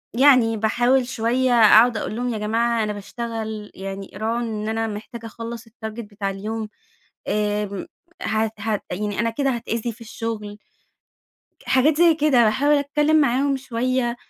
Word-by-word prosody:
يعني 250 -4 +5
باحاول 245 +4 +2
شوية 250 +1 0
أقعد 230 0 +6
أقول 215 - -4
لهم: 245 +1 -2
"يا 220 - -3
جماعة 230 +2 0
أنا 210 -1 -2
باشتغل 220 0 -6
يعني 195 0 -7
راعوا 225 +4 -1
إن 220 -2 -3
أنا 225 0 -1
محتاجة 220 +2 -7
أخلّص 230 0 -7
الtarget 225 - -23 0.3
بتاع 205 -2 -5
اليوم. 215 +2 -4 0.6
آمم 210 -2 -1 0.3
هت 220 0 0
هت 210 0 -2
يعني 205 +2 -3
أنا 230 0 +2
كده 275 +4 -1
هاتأذي 235 0 -3
في 230 +2 -16
الشغل." 215 -2 -5 1.1
حاجات 285 +4 +3
زي 340 -1 +5
كده. 290 -6 +4
باحاول 270 +7 +3
أتكلّم 295 +2 +2
معاهم 275 +1 +2
شوية، 255 -1 -1
230 Hz, 145 wpm, -22 LUFS, 215-250 Hz, 1.1 s, أقعد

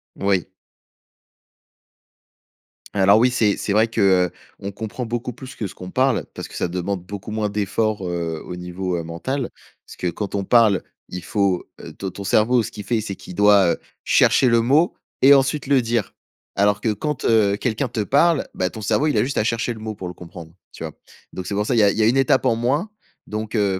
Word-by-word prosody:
Oui. 95 -3 0 2.5
Alors 100 +1 +5
oui, 125 +2 +4
c'est 110 -5 +2
c'est 100 - -3
vrai 110 +2 +4
qu'on 95 -1 0
comprend 110 +4 -5
beaucoup 120 +2 -3
plus 130 +2 -11
que 105 - -4
ce 95 - -6
qu'on 90 0 -9
parle, 130 +4 +1
parce - - -7
que - - -12
ça - - -1
demande 90 +2 -3
beaucoup 100 +2 -7
moins 110 -1 -1
d'effort, 105 0 -1
heu, 85 -2 -3
au 90 - -7
niveau, 90 0 -3
heu, 85 - -3
mental. 120 +11 -3 0.4
Parce - - -12
que 90 - -3
quand 95 +4 -4
on 100 - -1
parle, 110 -4 +4 0.3
il 90 -1 -7
faut, 100 -4 0
heu - - -10
ton 95 - -5
ton 100 - -8
cerveau, 115 +5 +3
ce - - -6
qu'il 105 - -8
fait, 115 +3 0
c'est 100 -3 -5
qu'il - - -11
doit, 100 -3 +5
heu, - - -18 0.3
chercher 130 - +4
le 115 0 +4
mot 145 +9 +3 0.3
et 135 +2 +8
ensuite 140 +1 +2
le 135 -2 +4
dire. 115 -3 -1 0.4
Alors 100 0 +2
que 110 - +1
quand, 150 +6 -3
heu, 105 -3 +3
quelqu'un 115 +4 -1
te 120 -2 -3
parle, 145 +7 +3
bah 90 0 0
ton 110 - -9
cerveau 140 +8 +1
il 150 - +1
a - - +4
juste 140 +3 -3
à 105 - +2
chercher 115 +1 0
le 110 - -11
mot 110 0 -5
pour 90 -2 -6
le - - -7
comprendre, 85 -2 -11 0.2
tu - - -8
vois? - - -5 0.4
Donc 90 -1 -6
c'est 100 - -3
pour 105 +1 0
ça, 125 - 0
il - - +2
y 110 - +5
a 100 - +5
il - - -5
y - - +2
a - - +4
1 125 +4 +3
étape 135 0 +3
en 115 -3 +2
moins. 140 - 0 0.4
Donc 110 +1 -5
heu, 100 -3 +1
105 Hz, 225 wpm, -21 LUFS, 95-120 Hz, 2.5 s, et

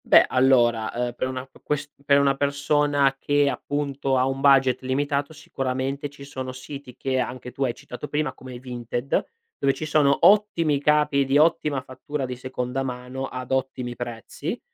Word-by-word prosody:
Beh, - - +7
allora, 120 -4 +3
uhm, 120 0 -1
per 130 - -1
un 130 0 -4
altro 130 +1 -9
ques 145 -1 -2
per 140 0 +5
una 140 -1 +3
persona 145 0 +2
che, 145 0 +2
appunto, 140 -2 -1
ha 130 - +3
un 135 0 -2
budget 135 -2 +5
limitato, 140 +2 -1
sicuramente 135 -1 -3
ci 140 0 -13
sono 130 -2 -6
siti 130 0 -9
che 130 -1 -1
anche 125 0 -4
tu 135 +3 -3
hai 125 -3 0
citato 145 +2 -8
prima, 150 +1 -1
come 130 -1 -10
Vinted, 120 0 -2 0.4
dove 135 - +3
ci 155 - -4
sono 145 -2 +3
ottimi 170 -9 +4
capi, 150 -1 +3
di 135 +1 +2
ottima 150 -3 +3
fattura 130 +2 -5
di 125 0 -5
seconda 125 +1 -3
mano, 130 +1 -4
ad 130 0 -7
ottimi 130 -2 -2
prezzi. 120 - -5
135 Hz, 170 wpm, -24 LUFS, 130-145 Hz, 0.4 s, Beh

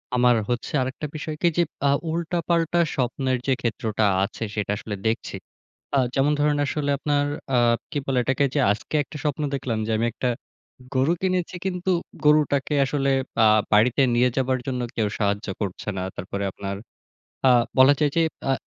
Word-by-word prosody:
আমার 125 -1 +4
হচ্ছে 120 0 -2
আরেকটা 130 +4 -3
বিষয় 155 +1 -4
কি? 175 - +4
যে, 170 - +5 0.2
আ - - +4 0.2
উল্টাপাল্টা 170 0 0 0.2
স্বপ্নের 130 0 0
যে 135 - +4
ক্ষেত্রটা 110 -2 -1 0.2
আছে, 105 - -4
সেটা 105 -1 -1
আসলে 105 -2 -5
দেখছি। 115 +1 -2 0.6
অ্যাঁ 135 -3 +3
যেমন 140 +2 +3
ধরেন, 150 0 +2
আসলে 145 0 -2
আপনার 145 0 +1 0.3
আ - - +4 0.3
কি - - -2
বলে 135 -2 0
এটাকে? 135 +2 +1
যে 145 - +1
আজকে 110 +8 -4
১টা 150 - -10
স্বপ্ন 150 0 -1
দেখলাম, 125 -4 -2
যে - - -1
আমি 115 - +1
১টা 125 - -1 0.7
গরু 135 +6 +3
কিনেছি। 185 -1 -1
কিন্তু 185 0 -1 0.3
গরুটাকে 150 -1 +3
আসলে 140 0 0 0.3
আ - - +7 0.3
বাড়িতে 120 +5 +4
নিয়ে 125 +1 +4
যাবার 130 -1 +1
জন্য, 125 -2 -2
কেউ 110 -2 +1
সাহায্য 105 0 0
করছে 100 +1 -4
না। 95 - -2
তারপরে 100 +2 -4
আপনার, 100 +1 -5 0.7
আ - - +6 0.3
বলা 130 +2 +8
যায় 150 -2 +3
যে 165 - +4 0.3
আ - - +4
135 Hz, 170 wpm, -24 LUFS, 120-150 Hz, 0.7 s, বলা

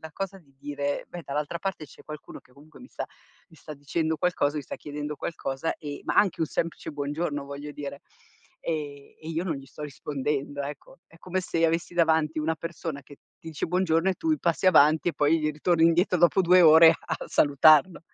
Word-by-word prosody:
la 160 - -9
cosa 195 0 -5
di 140 -6 -25
dire: 145 0 -3
"Beh, 175 - -8
dall'altra 150 +4 -3
parte 190 -5 -4
c'è - - -17
qualcuno 150 -1 -10
che - - -28
comunque 150 +3 -17
mi 255 - -13
sta - - -6 0.4
mi 160 - -18
sta 155 - -10
dicendo 160 +3 -2
qualcosa, 155 -4 0
mi 145 - -3
sta - - -7
chiedendo 150 0 -6
qualcosa 135 -2 -3
e" 145 -3 -7
ma - - -2
anche 200 -5 +3
un 160 - +2
semplice 165 +1 -3
buongiorno 145 0 -3
voglio 140 +1 -7
dire, 140 -1 -7 0.6
ehm, 145 -3 -5
"e 160 - -9
io 165 +2 -2
non 165 -5 -1
gli 135 0 -11
sto 150 - -11
rispondendo." 145 0 -3
Ecco. 140 0 -8
È 165 - -20
come 185 +2 -3
se 175 - -4
io 165 - +4
avessi 165 +1 -2
davanti 160 -2 +2
una 160 +1 -1
persona 165 -3 -6
che 145 - -14 0.2
ti - - -19
dice 155 - -4
"buongiorno" 180 0 +1
e - - -1
tu 320 - 0
passi 170 +2 0
avanti 155 -2 +5
e 170 - -1
poi 150 +3 +2
ritorni 165 +2 +2
indietro 175 +2 +3
dopo 175 +3 +4
2 180 +1 +6
ore 160 +1 +9
a 160 - -4
salutarlo. 150 +4 +4
155 Hz, 205 wpm, -26 LUFS, 145-170 Hz, 0.6 s, ore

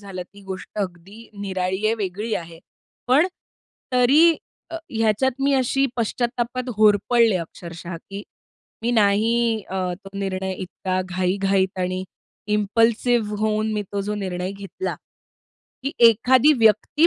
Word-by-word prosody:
झालं. 195 -3 -7
ती 200 +3 -17
गोष्ट 190 -1 -7
अगदी 195 +4 -6
निराळी 190 0 -2
आहे, 220 - +2
वेगळी 210 +1 -3
आहे. 165 -1 -6 0.5
पण 275 +7 +5 0.7
तरी 290 +7 +5 0.3
अ, 330 - -4
ह्याच्यात 225 +3 +2
मी 280 +1 +2
अशी 270 +1 +2
पश्चात्तापात 240 +2 -1
होरपळले 215 +1 +4
अक्षरशः, 170 0 -7
की 195 +4 -9 0.6
मी 235 - +1
नाही 225 +1 +2
अ, 190 - -4 0.3
तो - - -8
निर्णय 190 -1 -2
इतका 185 0 -3
घाई-घाईत 190 +1 0
आणि 185 +1 -2 0.5
इम्पल्सिव्ह 225 +1 +2
होऊन 215 0 0
मी 210 -1 -1
तो 200 - -1
जो 205 +1 -3
निर्णय 185 -2 -3
घेतला, 200 - -5 0.9
की 275 +2 -2 0.2
एखादी 255 +6 +4
व्यक्ती 225 - +4
210 Hz, 125 wpm, -22 LUFS, 190-235 Hz, 0.9 s, पण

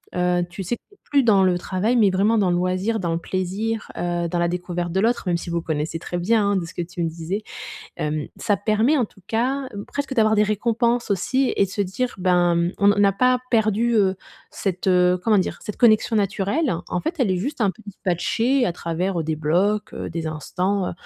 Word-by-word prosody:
heu, 180 0 +1
tu 185 +3 -6
sais? 235 +7 -2
Tu 405 - -20
es - - -34
plus 280 -2 +4
dans 200 -4 +5
le 180 -1 +3
travail, 190 +7 -1
mais 205 -4 +5
vraiment 205 +4 +2
dans 195 -3 +2
le - - +2
loisir, 185 +5 0
dans 170 -3 -1
le - - 0
plaisir, 195 +5 -3
heu, 175 -1 -1
dans 175 +1 -2
la 170 - +2
découverte 175 0 -3
de 190 - 0
l'autre, 235 +3 +1
même 175 -1 +2
si 170 - -7
vous 170 0 -1
connaissez 155 0 -2
très 175 - -5
bien, 205 +3 +2
hein, - - +1
de 180 -3 -1
ce 165 - -10
que - - -3
tu 175 +1 -7
me 165 - 0
disais. 170 +5 -4 0.6
Hem, 150 -1 -2
ça 205 - +1
permet 220 +8 +2
en 245 - +2
tout 195 - -22
cas, 260 +4 0 0.2
presque 285 -1 -3
d'avoir 220 -2 +4
des 210 - +4
récompenses 235 +2 0
aussi 260 +8 +1
et - - +3
de - - -11
se 205 - -2
dire 200 +6 -2
ben, 180 -2 +3
mmh, 170 +1 +1
on 205 0 +4
a 195 - +4
pas 250 +5 +3
perdu, 225 +1 +2
heu, 195 -3 +3 0.3
cette, 190 -1 -3
heu, 180 0 +4
comment 215 -3 +4
dire? 185 - -1
Cette 210 - -6
connexion 225 -1 +4
naturelle. 205 - 0 0.2
En 180 - -1
fait, 325 +2 -2
elle 235 -7 +2
est 185 - +1
juste 265 +6 -3
un 205 - +3
peu - - -18
dispatchée 220 +7 0
à 175 - 0
travers, 175 +3 -2
heu, 160 - -1
des 160 0 -1
blocs, 190 +7 +1
heu, - - -5
des 165 -1 -4
instants, 180 +5 -1
heu, - - -4
195 Hz, 235 wpm, -22 LUFS, 175-225 Hz, 0.6 s, dans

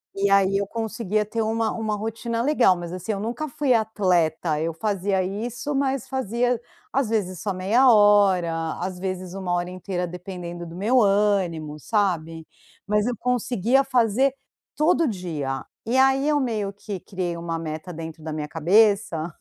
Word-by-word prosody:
E 200 0 +1
aí, 195 0 +4
eu 200 0 -1
conseguia 220 -1 -2
ter 225 +2 -2
uma 225 0 0
uma 220 -2 -2
rotina 225 +2 -3
legal. 255 -9 +4
Mas 175 -1 -6
assim, 185 +4 -4
eu 200 - -3
nunca 235 +8 -3
fui 270 0 +1
atleta, 180 -8 +1
eu 165 +1 -1
fazia 195 0 0
isso, 240 +9 -4
mas 270 -2 0
fazia, 245 -1 0 0.3
às 270 -4 +1
vezes, 190 -5 -1
só 205 - -1
meia 220 +8 +4
hora, 190 -6 +4
às 180 0 -4
vezes, 185 -1 -4
1 190 -2 -3
hora 175 0 -1
inteira, 185 0 -3
dependendo 175 -1 -7
do 165 - -10
meu 230 +7 +3
ânimo, 195 -7 +1
sabe. 165 -5 -1 0.4
Mas 210 +1 +2
eu 245 - -1
conseguia 250 +1 +1
fazer 250 +2 +2 0.4
todo 325 +1 +3
dia, 160 - -3 0.2
e 240 - 0
aí 270 +1 +4
eu 300 -1 +3
meio 220 -7 -1
que 200 -1 -6
criei 180 -1 -4
uma 170 -1 -3
meta 160 +2 -5
dentro 160 -1 -8
da 155 - -5
minha 150 -1 -4
cabeça 175 0 +2
200 Hz, 165 wpm, -24 LUFS, 175-230 Hz, 0.4 s, aí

